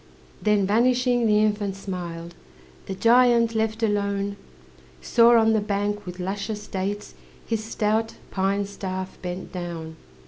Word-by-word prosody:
Then, 210 Hz, -2 st, +3 dB
vanishing, 245 Hz, +3 st, +2 dB
the 210 Hz, -1 st, +4 dB
infant 205 Hz, -2 st, 0 dB
smiled. 175 Hz, -3 st, -6 dB, 0.5 s
The 190 Hz, -, -4 dB
giant, 235 Hz, +1 st, +4 dB
left 220 Hz, 0 st, -1 dB
alone, 200 Hz, -1 st, 0 dB, 0.6 s
Saw 235 Hz, -, +5 dB
on 225 Hz, 0 st, +4 dB
the 220 Hz, -, +2 dB
bank, 205 Hz, -1 st, -2 dB
with 180 Hz, +1 st, -7 dB
luscious 205 Hz, +3 st, -4 dB
dates, 200 Hz, +2 st, -4 dB, 0.3 s
His 225 Hz, -2 st, -2 dB
stout 220 Hz, 0 st, -1 dB, 0.2 s
pine 195 Hz, +1 st, 0 dB
staff 190 Hz, -1 st, -6 dB
bent 180 Hz, 0 st, -5 dB
down. 170 Hz, -3 st, -6 dB
205 Hz, 130 wpm, -24 LUFS, 190-225 Hz, 0.6 s, Saw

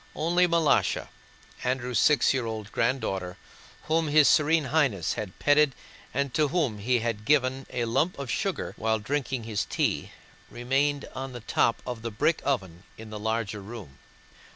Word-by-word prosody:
Only 175 Hz, +3 st, +2 dB
Malásha, 170 Hz, -3 st, +2 dB, 0.5 s
Andrew's 125 Hz, -2 st, 0 dB
six 150 Hz, -4 st, +4 dB
year 125 Hz, -3 st, -1 dB
old 110 Hz, -2 st, -5 dB
granddaughter 95 Hz, -8 st, -1 dB, 0.5 s
whom 160 Hz, 0 st, +1 dB
his 150 Hz, 0 st, +5 dB
Serene 155 Hz, +1 st, +4 dB
Highness 130 Hz, -, +2 dB
had 100 Hz, -4 st, -6 dB
petted 145 Hz, -1 st, +3 dB, 0.4 s
and 140 Hz, -1 st, -1 dB
to 155 Hz, -1 st, +2 dB
whom 145 Hz, -10 st, -1 dB
he 120 Hz, +3 st, +1 dB
had 115 Hz, -2 st, -2 dB
given 135 Hz, 0 st, +1 dB
a 120 Hz, -1 st, -2 dB
lump 135 Hz, +10 st, 0 dB
of 140 Hz, -3 st, -4 dB
sugar 195 Hz, -2 st, -2 dB
while 110 Hz, 0 st, +1 dB
drinking 130 Hz, +2 st, -2 dB
his 110 Hz, -2 st, -2 dB
tea, -, -, -1 dB, 0.4 s
remained 135 Hz, +4 st, 0 dB
on 130 Hz, 0 st, -6 dB
the 120 Hz, -, -7 dB
top 115 Hz, +1 st, +1 dB
of 125 Hz, -3 st, -5 dB
the 115 Hz, -, -3 dB
brick 135 Hz, +9 st, +1 dB
oven 95 Hz, -11 st, -2 dB, 0.2 s
in 110 Hz, -1 st, -10 dB
the 105 Hz, -, -6 dB
larger 110 Hz, -1 st, -2 dB
room. 100 Hz, -, -10 dB
125 Hz, 160 wpm, -27 LUFS, 110-145 Hz, 0.5 s, his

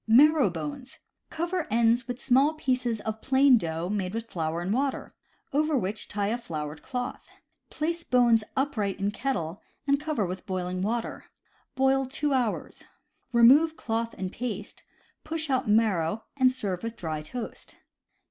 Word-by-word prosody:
Marrow 280 Hz, +2 st, +6 dB
Bones. 165 Hz, -, -6 dB, 0.2 s
— -, -, -54 dB
Cover 345 Hz, 0 st, -1 dB
ends 235 Hz, +2 st, +3 dB
with 245 Hz, 0 st, -4 dB
small 275 Hz, +5 st, +3 dB
pieces 250 Hz, -6 st, 0 dB
of 220 Hz, 0 st, -4 dB
plain 265 Hz, -2 st, +5 dB
dough 165 Hz, -1 st, -3 dB
made 195 Hz, 0 st, -2 dB
with 230 Hz, 0 st, -3 dB
flour 160 Hz, -1 st, -2 dB
and 185 Hz, +4 st, -1 dB
water, 270 Hz, +3 st, -1 dB, 0.4 s
over 305 Hz, 0 st, +2 dB
which 210 Hz, -1 st, -3 dB
tie 200 Hz, -1 st, -1 dB
a 235 Hz, +2 st, -1 dB
floured 150 Hz, -8 st, -5 dB
cloth; 250 Hz, -1 st, -5 dB, 0.4 s
place 335 Hz, +2 st, -2 dB
bones 240 Hz, -3 st, +4 dB
upright 215 Hz, -9 st, 0 dB
in 200 Hz, +1 st, 0 dB
kettle, 200 Hz, -9 st, -3 dB, 0.2 s
and 280 Hz, 0 st, +3 dB
cover 295 Hz, -8 st, -1 dB
with 180 Hz, +1 st, -6 dB
boiling 185 Hz, -1 st, -2 dB
water. 230 Hz, +4 st, -2 dB, 0.5 s
Boil 270 Hz, 0 st, +3 dB
two 285 Hz, +2 st, -1 dB
hours. 245 Hz, -5 st, -1 dB, 0.5 s
Remove 275 Hz, +7 st, +6 dB
cloth 230 Hz, 0 st, -2 dB
and 185 Hz, -1 st, -3 dB
paste, 215 Hz, -4 st, -5 dB, 0.4 s
push 315 Hz, -2 st, -3 dB
out 255 Hz, -4 st, +1 dB
marrow, 210 Hz, -3 st, +2 dB
and 260 Hz, -2 st, +4 dB
serve 200 Hz, -8 st, -3 dB
with 230 Hz, 0 st, -5 dB
dry 155 Hz, -3 st, -3 dB
toast. 225 Hz, +10 st, -7 dB
230 Hz, 155 wpm, -27 LUFS, 195-270 Hz, 0.5 s, Marrow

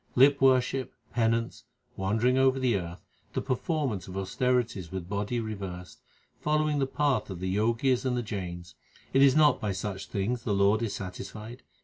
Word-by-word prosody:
Lip 140 Hz, +2 st, +5 dB
worship, 130 Hz, 0 st, +2 dB, 0.2 s
penance, 115 Hz, -1 st, 0 dB, 0.3 s
wandering 110 Hz, +6 st, +1 dB
over 130 Hz, 0 st, +4 dB
the 130 Hz, -4 st, +2 dB
earth, 85 Hz, -2 st, -5 dB, 0.3 s
the -, -, 0 dB
per 135 Hz, -, 0 dB
formance 130 Hz, -, -2 dB
of 95 Hz, +1 st, -7 dB
austerities 115 Hz, -2 st, 0 dB
with 95 Hz, -2 st, -5 dB
body 100 Hz, +4 st, -2 dB
reversed, 95 Hz, -5 st, -6 dB, 0.4 s
Following 150 Hz, -1 st, +1 dB
the 135 Hz, -, +1 dB
path 145 Hz, -3 st, 0 dB
of 95 Hz, -3 st, -6 dB
the 95 Hz, +1 st, -2 dB
Jogis 115 Hz, +5 st, +2 dB
and 125 Hz, -2 st, 0 dB
the 120 Hz, -, -1 dB
Jains 90 Hz, -6 st, -6 dB, 0.4 s
it 135 Hz, -, +5 dB
is 140 Hz, -1 st, +6 dB
not 150 Hz, -3 st, +5 dB
by 105 Hz, -, -1 dB
such 95 Hz, +1 st, -4 dB
things 115 Hz, +5 st, -2 dB
the 105 Hz, -3 st, -1 dB
Lord 100 Hz, +3 st, +3 dB
is 115 Hz, -3 st, -2 dB
satisfied. 105 Hz, +5 st, -7 dB
115 Hz, 170 wpm, -28 LUFS, 95-130 Hz, 0.4 s, is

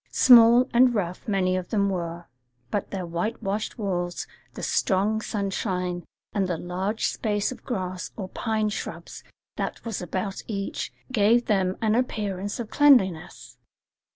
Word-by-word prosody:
Small 240 Hz, 0 st, +7 dB
and 245 Hz, 0 st, +5 dB
rough 180 Hz, -1 st, -3 dB
many 185 Hz, -3 st, +1 dB
of 185 Hz, -1 st, -3 dB
them 200 Hz, -2 st, +1 dB
were; 170 Hz, -2 st, -3 dB, 0.5 s
but 205 Hz, -, -2 dB
their 190 Hz, -2 st, -4 dB
whitewashed 195 Hz, +4 st, -3 dB
walls, 175 Hz, -5 st, -2 dB, 0.3 s
the -, -, -7 dB
strong 210 Hz, +1 st, +1 dB
sunshine, 185 Hz, -4 st, -2 dB, 0.3 s
and 195 Hz, -2 st, +1 dB
the 175 Hz, -2 st, -1 dB
large 190 Hz, +6 st, -2 dB
space 210 Hz, -1 st, -1 dB
of 255 Hz, -, -10 dB
grass 185 Hz, -6 st, -4 dB
or 195 Hz, -4 st, -4 dB
pine 215 Hz, +2 st, -1 dB
shrubs 210 Hz, -, -6 dB, 0.3 s
that -, -, -4 dB
was 225 Hz, -5 st, -3 dB
about 190 Hz, +3 st, -3 dB
each, 200 Hz, -3 st, -4 dB, 0.2 s
gave 235 Hz, +1 st, +3 dB
them 190 Hz, -3 st, +1 dB
an 215 Hz, -1 st, +3 dB
appearance 205 Hz, -5 st, -2 dB
of 230 Hz, -3 st, -5 dB
cleanliness. 240 Hz, -, +3 dB
200 Hz, 140 wpm, -25 LUFS, 185-220 Hz, 0.5 s, Small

